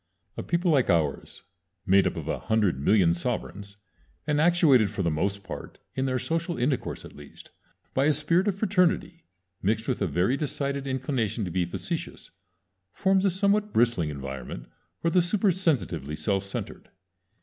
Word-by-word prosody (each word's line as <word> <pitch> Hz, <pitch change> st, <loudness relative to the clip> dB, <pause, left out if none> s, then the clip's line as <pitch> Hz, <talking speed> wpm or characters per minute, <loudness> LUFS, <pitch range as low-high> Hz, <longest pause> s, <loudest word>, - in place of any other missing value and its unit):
A -, -, -4 dB
people 170 Hz, +1 st, 0 dB
like 135 Hz, -5 st, +3 dB
ours, 80 Hz, -5 st, 0 dB, 0.4 s
made 95 Hz, 0 st, +4 dB
up -, -, -2 dB
of -, -, -6 dB
a -, -, -2 dB
hundred 105 Hz, -10 st, +1 dB
million 85 Hz, +2 st, +4 dB
sovereigns, 100 Hz, 0 st, -4 dB, 0.5 s
and 150 Hz, -1 st, +1 dB
actuated 155 Hz, -, +5 dB
for 100 Hz, -1 st, -3 dB
the 85 Hz, -, +1 dB
most 100 Hz, +6 st, -1 dB
part, -, -, -8 dB, 0.2 s
in 130 Hz, 0 st, -1 dB
their 130 Hz, -1 st, 0 dB
social 165 Hz, +6 st, -2 dB
intercourse 130 Hz, +2 st, -1 dB
at -, -, -12 dB
least, 75 Hz, -1 st, -13 dB, 0.4 s
by 135 Hz, -, +2 dB
a 155 Hz, -, +5 dB
spirit 170 Hz, +6 st, +1 dB
of 200 Hz, -, +1 dB
fraternity, 180 Hz, -4 st, +1 dB, 0.4 s
mixed 110 Hz, +3 st, 0 dB
with -, -, -1 dB
a -, -, +2 dB
very 95 Hz, +9 st, +1 dB
decided 140 Hz, -2 st, -2 dB
inclination 130 Hz, -5 st, -1 dB
to 90 Hz, -, -5 dB
be 90 Hz, 0 st, 0 dB
facetious, 85 Hz, -, -5 dB, 0.6 s
forms 190 Hz, 0 st, +2 dB
a -, -, +5 dB
somewhat 200 Hz, +3 st, +1 dB
bristling 115 Hz, -9 st, +2 dB
environment 65 Hz, -4 st, -7 dB, 0.3 s
for 165 Hz, -, 0 dB
the 180 Hz, -, +4 dB
supersensitively 170 Hz, -, 0 dB
self 95 Hz, +5 st, 0 dB
centered. 100 Hz, -, -6 dB
130 Hz, 160 wpm, -27 LUFS, -, 0.6 s, actuated